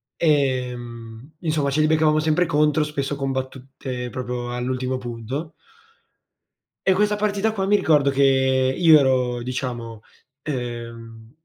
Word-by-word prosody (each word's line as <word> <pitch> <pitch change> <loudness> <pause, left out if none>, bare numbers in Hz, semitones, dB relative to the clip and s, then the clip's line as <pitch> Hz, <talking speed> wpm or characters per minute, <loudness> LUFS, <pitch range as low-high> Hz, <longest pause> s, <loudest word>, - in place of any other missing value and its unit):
Ehm, 125 -4 -2
insomma 155 -4 0
ce 145 +3 +1
li 155 - +3
beccavamo 155 -1 +3
sempre 155 +3 +2
contro, 150 -1 +2
spesso 145 -1 -3
combattute 130 -2 -5
proprio 125 -1 -4
all'ultimo 130 +1 -2
punto 125 +6 -6 1.3
e 190 - +5
questa 210 +2 +2
partita 210 +1 0
qua 195 -3 -2
mi 205 - +4
ricordo 150 -7 +3
che 140 0 +2 0.5
io 160 -3 +7
ero 125 -3 +1
diciamo, 120 -3 -5 0.4
ehm, 115 -3 -6
135 Hz, 120 wpm, -22 LUFS, 125-155 Hz, 1.3 s, io